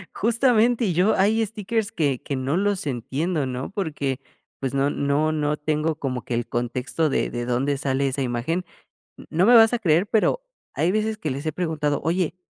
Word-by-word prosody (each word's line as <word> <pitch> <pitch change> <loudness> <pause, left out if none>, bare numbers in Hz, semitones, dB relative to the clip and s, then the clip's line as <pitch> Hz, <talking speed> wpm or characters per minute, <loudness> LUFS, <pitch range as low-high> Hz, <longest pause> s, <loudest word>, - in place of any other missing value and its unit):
Justamente, 235 +1 +3
y 185 - 0
yo, 180 +6 +3
hay 220 +3 +3
stickers 220 +1 -2
que 145 - 0
que 140 - -4
no 130 +5 -1
los 200 -3 0
entiendo, 140 +5 -2
¿no? 130 0 -4
Porque, 145 -9 -2 0.4
pues, 135 0 -3
no 140 +1 +2
no 145 +2 +1
no 150 -1 0
tengo 155 +1 -1
como 130 -5 -4
que - - -4
el 120 0 -1
contexto 125 +6 -1
de - - 0
de 120 0 -4
dónde 130 +4 0
sale 140 0 0
esa 135 +1 -2
imagen. 130 +9 -1 0.6
No 170 +4 +2
me 240 +3 +7
vas 225 +1 +7
a 245 - +1
creer, 175 -1 +2
pero, 220 - +2 0.3
hay 170 - +2
veces 215 +1 0
que 160 - -3
les 140 +3 -4
he 155 - 0
preguntado: 155 -3 -1
"Oye, 175 +2 0
155 Hz, 190 wpm, -24 LUFS, 135-200 Hz, 0.6 s, me